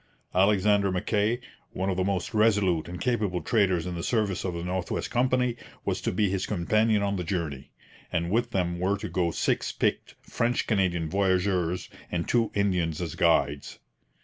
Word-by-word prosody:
Alexander 100 +1 +3
Mackay, 105 +5 0 0.3
one 95 +1 -1
of - - -1
the 95 - 0
most 95 +2 -2
resolute 105 -7 +2
and 90 +1 -7
capable 105 -8 0
traders 95 -7 +1
in 90 - -3
the 85 - -4
service 105 -3 0
of 90 -2 -3
the 85 - -4
North 90 0 -3
West - - -3
Company, 125 -1 +2 0.3
was - - -1
to - - -1
be 105 +3 +1
his 95 0 -1
companion 110 +3 +2
on 100 0 0
the 90 - -2
journey; 80 -6 -3 0.4
and 85 +1 -1
with 120 +3 +1
them 90 -4 -1
were 95 +3 +1
to - - -5
go 90 -2 0
six - - 0
picked - - -1
French 120 +1 0
Canadian 90 -6 +1
voyageurs 90 -1 +1 0.2
and 85 -1 -2
two 115 -2 +2
Indians 90 -6 0
as 85 -4 -3
guides. 75 -4 +1
95 Hz, 175 wpm, -27 LUFS, 85-105 Hz, 0.4 s, Alexander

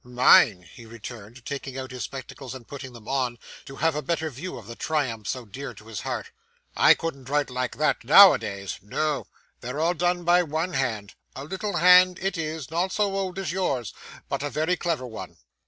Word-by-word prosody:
'Mine!' 120 -6 +5
he 115 +7 -14
returned, 115 +1 -10
taking 135 -2 -5
out 130 0 -6
his 125 -1 -4
spectacles 135 -1 -8
and 125 -3 -11
putting 135 -3 -8
them 115 -3 -14
on, 130 -3 -1 0.3
to 135 - -10
have 160 +3 +1
a 150 - -1
better 160 +1 -2
view 165 +9 -7
of 115 - -11
the 115 +2 -9
triumphs 120 -10 -2
so 125 -2 -3
dear 130 +7 -8
to 110 - -15
his 110 -3 -6
heart. - - -4 0.4
'I - - +7
couldn't 140 -6 -6
write 145 -2 0
like 125 0 -2
that, 150 -4 +1
now 195 +10 +9
a - - -1
days. 100 -2 -5
No. 150 +9 -2 0.3
They're 125 +4 -5
all 165 +2 +2
done 175 +1 0
by 175 +1 +5
one 165 +2 -2
hand; 110 -8 -2 0.2
a 135 - -6
little 190 +4 -3
hand 180 +1 +7
it 195 0 -2
is, 155 -3 -4
not 175 +3 0
so 205 -1 0
old 190 -2 -3
as 190 -5 -2
yours, 140 - -1 0.3
but - - -3
a 145 - -2
very 155 +6 0
clever 165 -7 -2
one. 115 -3 -9
140 Hz, 205 wpm, -25 LUFS, 120-170 Hz, 0.4 s, now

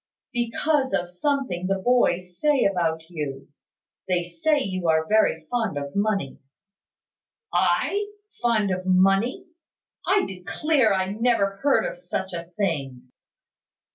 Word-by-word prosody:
"Because 265 +3 0
of 175 -2 -1
something 190 -5 -1
the 195 0 +1
boys 185 -5 +1
say 295 -4 +3
about 170 -4 +1
you. 145 -5 -5 0.6
They 180 -2 +1
say 175 - 0
you 185 -7 -3
are 160 0 +3
very 220 +1 +2
fond 225 -10 -1
of 140 0 -5
money." 200 -8 -1 1.1
"I! 280 - +1 0.3
Fond 220 -5 +2
of 185 0 -3
money! 195 - +3 0.6
I 390 0 +3
declare 225 - +1
I 190 0 0
never 210 -3 +1
heard 280 +7 +2
of - - -5
such 190 - -4
a 170 0 -6
thing." 135 -10 -3
195 Hz, 125 wpm, -24 LUFS, 175-245 Hz, 1.1 s, say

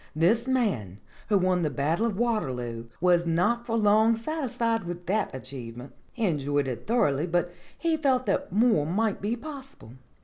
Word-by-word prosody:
"This 215 +10 +2
man 190 - 0 0.3
who 205 - +4
won 185 -1 +2
the 155 - +1
Battle 155 - 0
of 210 -4 -3
Waterloo 125 - -2
was 175 -1 +3
not 235 +9 +1
for 230 -1 0
long 220 +1 +4
satisfied 230 -4 -1
with 175 0 -6
that 205 +3 0
achievement. 125 -1 -8 0.2
He 230 - -1
enjoyed 145 -4 0
it 120 -2 -5
thor 235 -1 +3
oughly, 145 +5 -2
but 175 +1 0 0.2
he 330 -1 0
felt 265 -4 +1
that - - -1
more 215 -7 +3
might 210 +4 0
be 210 +4 -1
possible. 270 - -10
190 Hz, 170 wpm, -27 LUFS, 145-230 Hz, 0.3 s, who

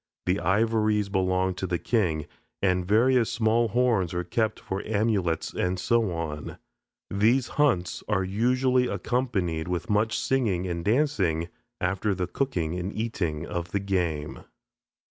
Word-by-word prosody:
The 90 +2 +1
ivories 105 +2 +2
belong 95 -1 +1
to 95 +1 -4
the 90 -1 0
king, 85 -9 0 0.3
and 90 -2 +2
various 115 +3 +3
small 115 0 +2
horns 110 -6 +1
are 90 - -1
kept 110 +5 -1
for 95 +1 -4
amulets, 100 -6 0
and 90 +1 -1
so 115 0 +2
on. 80 -3 -5 0.5
These 115 +6 +2
hunts 125 -13 +1
are 105 -3 +1
usually 125 +6 +2
accompanied 95 -14 -1
with 90 +5 -2
much 110 +2 +2
singing 110 -9 0
and 85 -2 -3
dancing, 100 - +1 0.3
after 95 +3 0
the 90 -1 -1
cooking 90 - -2
and 90 +3 -3
eating 95 -9 -2
of 85 0 -5
the 100 - +2
game. 90 -6 -2
100 Hz, 140 wpm, -26 LUFS, 90-115 Hz, 0.5 s, various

